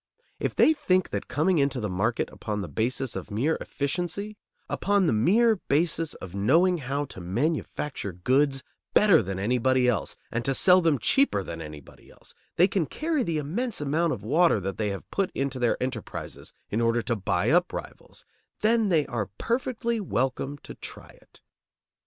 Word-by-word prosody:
If - - -2
they 315 - +5
think 185 - +1
that 100 - -3
coming 155 +6 +1
into 140 -2 +1
the 105 - -2
market 105 +5 0
upon 105 -1 -4
the 95 - -5
basis 120 - -2
of - - -6
mere 130 +10 0
efficiency, 180 +8 -3 0.3
upon 200 -1 +1
the 160 - +2
mere 215 - +4
basis 165 0 0
of 95 -2 -9
knowing 165 - +3
how 140 +2 -2
to 95 - -10
manufacture 130 - -2
goods 135 - +1 0.3
better 205 - +6
than 95 -2 -4
anybody 125 +5 +2
else 115 -5 0 0.2
and 120 - -2
to 135 +1 +1
sell 185 +4 +6
them 165 -4 +2
cheaper 130 - +2
than 85 -2 -7
anybody 75 -3 -11
else, - - -12 0.2
they 180 - +5
can 185 -6 -1
carry 315 -2 -1
the 165 -9 -1
immense 195 - -2
amount 155 +3 0
of - - -4
water 155 +2 +3
that 95 0 -4
they 105 -1 0
have 100 -1 -6
put 195 -2 0
into 135 -1 -2
their 120 -1 +2
enterprises 125 -4 -5 0.2
in 110 +3 0
order 115 0 +2
to 120 - -1
buy 95 -1 0
up 175 +2 +3
rivals, - - -9 0.4
then 220 -1 +3
they 160 -5 +3
are 115 -6 -3
perfectly 235 -1 -1
welcome 135 - -2
to - - -9
try - - -9
it. - - -20
140 Hz, 175 wpm, -26 LUFS, 110-180 Hz, 0.4 s, better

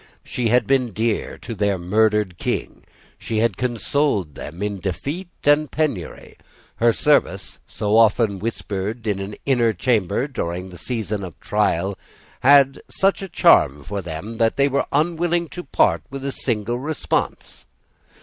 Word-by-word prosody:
She 120 -2 -2
had 120 0 +3
been 130 -1 +2
dear 110 +1 -2
to 115 - -7
their 100 -2 0
murdered 105 0 +1
King. - - -3 0.4
She 110 - -3
had 115 +2 +2
consoled 120 - 0
them 85 +8 -7
in 100 -1 -2
defeat 140 - -4
and 145 0 +3
penury. 140 - -3 0.4
Her 115 0 +4
service, - - +1
so 105 0 -1
often 110 -2 +4
whispered 110 +1 -4
in 105 -3 -1
an 100 +1 -5
inner 120 -5 +3
chamber 110 +3 0
during 90 -8 -4
the 90 -2 -11
season 105 -2 -3
of 90 -3 -9
trial, 100 -2 0 0.4
had 135 0 +5
such 195 +1 +1
a 195 - -6
charm 70 - +4
for 100 +6 -4
them 90 +7 -6
that 115 0 +2
they 140 0 +3
were 140 0 0
unwilling 170 +3 +1
to 180 - -7
part 85 - +2
with 135 0 -7
a 140 - -1
single 120 -2 -2
response. 155 +3 -3
110 Hz, 150 wpm, -22 LUFS, 100-135 Hz, 0.4 s, had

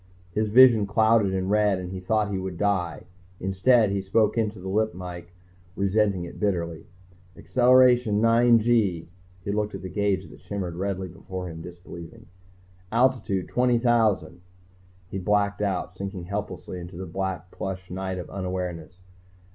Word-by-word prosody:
His 105 +3 0
vision 115 -2 +7
clouded 110 -1 +3
in 95 0 -1
red 105 -2 +3
and 90 0 -6
he 95 - -5
thought 105 +2 0
he 95 - -1
would 95 -2 -5
die. 90 -6 -1 0.4
Instead, 100 +4 +3
he 100 0 -1
spoke 105 +3 +2
into 110 -2 -1
the 95 +1 -8
lip 110 +2 0
mike, 90 -1 -8 0.4
resenting 100 -2 +1
it 85 - -10
bitterly. 85 -5 -2 0.5
"Acceleration... 125 -3 +4
nine 115 +1 +5
gee." 105 -8 +1 0.4
He 100 - -1
looked 105 0 -1
at 95 - -8
the 95 - -5
gauge 100 +1 0
that - - -14
shimmered 95 -4 -4
redly 95 +1 -3
before 90 +2 -7
him, 80 0 -8
disbelieving. 85 -1 -11 0.7
"Altitude 115 -6 +1
20,000." 120 -6 +2 0.7
He 95 - -5
blacked 100 +2 +1
out, 95 -4 -2
sinking 95 -1 -6
helplessly 95 -1 -5
into 85 0 -9
the 95 - -5
black 95 0 -4
plush 95 -1 -6
night 95 0 -3
of 90 - -6
unawareness. 90 -2 -5
95 Hz, 150 wpm, -25 LUFS, 90-110 Hz, 0.7 s, vision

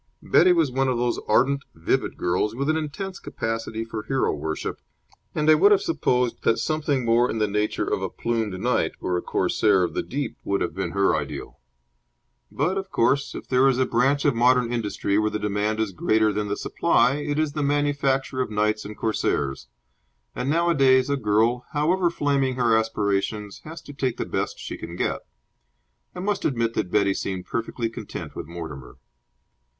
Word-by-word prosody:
Betty 180 +2 +5
was 165 -6 +2
one 135 +1 +1
of 130 -2 +1
those 120 0 0
ardent, 140 +2 +3
vivid 80 - -1
girls, 90 +5 0
with 140 +4 0
an - - 0
intense 160 +5 -4
capacity 115 0 -4
for 115 -1 -5
hero 135 +5 0
worship, 80 +1 -4 0.5
and 150 0 0
I 155 - +8
would 405 - +5
have 410 0 +4
supposed 125 - 0
that 115 - +2
something 145 -5 -1
more 115 +2 +3
in - - -2
the 105 -1 +1
nature 105 +1 -1
of - - -1
a - - -2
plumed 110 -5 -2
knight - - +1
or 90 - -1
a 90 - 0
corsair 100 -4 +2
of 90 - -2
the - - -1
deep 140 -3 -4
would 100 0 0
have 85 - -1
been 95 +3 -3
her 100 0 +3
ideal. - - -5 0.9
But, 175 +8 0
of 190 0 -7
course, 140 -2 +1
if - - -8
there 130 +1 +4
is 130 -2 +3
a 130 - +3
branch 135 +5 +1
of 145 - +4
modern 120 0 +3
industry 105 -3 0
where 110 0 +1
the 105 - -2
demand 105 +1 -1
is 110 -3 0
greater 110 +4 +2
than 105 0 -2
the 100 - -2
supply, 135 +3 +2
it 145 0 -2
is 155 -2 0
the 150 - -2
manufacture 140 -2 0
of 130 - -2
knights 105 0 0
and 105 0 -8
corsairs; 70 - -1 0.7
and 125 +2 -2
nowadays 140 -5 +3
a - - +3
girl, 115 +1 +1
however 170 +4 +2
flaming 140 -5 0
her 120 -3 +3
aspirations, 105 -2 -1
has 160 +2 -9
to 145 - -10
take 130 -3 -2
the - - -2
best - - -3
she - - -6
can 85 +1 -7
get. - - -1 0.9
I 180 - -5
must 205 +1 -1
admit 115 -4 0
that 90 - -2
Betty 100 0 +2
seemed 95 -2 -4
perfectly 115 +3 -3
content 115 - -7
with - - -6
Mortimer. 80 -7 -8
120 Hz, 190 wpm, -24 LUFS, 105-140 Hz, 0.9 s, I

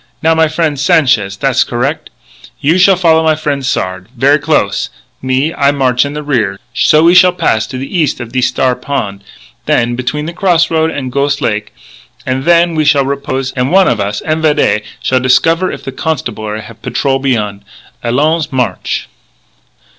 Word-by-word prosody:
Now, 165 +1 +4
my 160 0 +3
frien', 155 -1 -1
Sanchez! 125 -9 +2
Tha's 130 +3 +2
correc'! 135 +5 -3 0.5
You 160 +6 +2
shall 190 +1 +5
follow 165 -3 +3
my 160 -1 +3
frien' 145 -2 -2
Sard 95 -8 -3
ver' 140 +4 +3
close. 150 -9 0 0.3
Me, 130 +5 0
I 140 -1 +2
march 130 -2 +1
in 140 - -5
the 150 0 -5
rear. 110 -9 -1
So 155 +4 +3
we 170 +1 +5
shall 180 0 +6
pass 110 -11 0
to 130 - -6
the 135 +8 -3
eas' 150 -6 0
of 120 -2 -7
thees 130 -1 +2
Star 130 -1 0
Pon', 115 -7 -4 0.5
then 120 +1 +1
between 140 +4 -3
the 170 - -5
cross 175 -3 +1
road 160 0 +1
an' 135 -5 -5
Ghos' 140 +1 0
Lake; 105 -6 -2 0.5
an' 130 +1 -2
then 170 0 +4
we 155 -1 +1
shall 145 -2 +3
repose; 135 -1 -3
an' 125 0 -1
one 190 +2 +4
of 115 - +1
us, 100 +1 -3
en 155 0 -1
vidette, 150 -8 +2 0.2
shall 130 - +2
discover 165 +8 +2
if - - -8
the 135 - -5
Constabulary 110 -8 -4
have 115 0 -13
patrol 135 -1 -1
beyon'.... 105 -7 -2 0.4
Allons! 150 +7 0
March!" 125 -2 -2
140 Hz, 180 wpm, -13 LUFS, 125-160 Hz, 0.5 s, shall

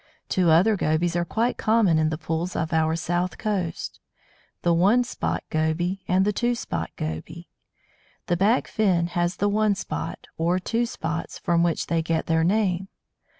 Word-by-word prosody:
Two 180 -3 +2
other 185 +7 +5
Gobies 165 0 0
are 175 - +1
quite 225 +8 -1
common 215 -7 +3
in 155 0 +2
the 155 - -3
pools 165 +3 -3
of 160 +1 -2
our 160 0 +2
south 175 +2 -1
coast 195 -6 -3 0.6
the 170 - +3
One 200 +9 +4
spot 240 - -3
Goby 170 +5 0
and 185 +2 +3
the 210 - +1
Two 240 +3 +1
spot 85 - -4
Goby. 80 +1 -6 0.8
The 175 - +1
back 205 +7 +2
fin 185 -6 +2
has 175 +1 0
the 205 - 0
one 210 0 +2
spot, - - -5
or 170 +2 +2
two 230 +6 -1
spots, 165 -6 -4
from 170 -1 +1
which 170 -1 +1
they 165 -1 0
get 160 0 -1
their 160 0 +2
name. 190 0 +1
175 Hz, 170 wpm, -25 LUFS, 165-205 Hz, 0.8 s, other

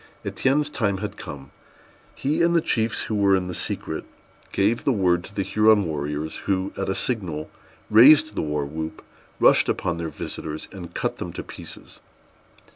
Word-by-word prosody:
Étienne's 145 +3 +1
time 100 -8 0
had 100 +1 -5
come. 70 -1 -9 0.6
He 145 +3 0
and 170 0 +3
the - - +6
chiefs 110 -7 0
who - - -4
were 100 -2 +4
in 95 -1 0
the 90 - -5
secret - - -3 0.5
gave 105 +4 +1
the 140 - +2
word 90 -6 +2
to 100 - -13
the 100 - 0
Huron 110 0 +4
warriors, 75 0 -3
who, 95 0 0
at 95 - -3
a 95 - 0
signal, 85 -11 -2 0.4
raised 145 +8 +7
the - - -2
war 75 -1 -1
whoop, 80 +2 -6 0.4
rushed - - +5
upon 85 -1 -1
their 85 -1 -3
visitors, 75 0 -6
and 90 -3 -9
cut - - -2
them - - -5
to - - -5
pieces. - - -11
95 Hz, 175 wpm, -24 LUFS, 80-110 Hz, 0.6 s, raised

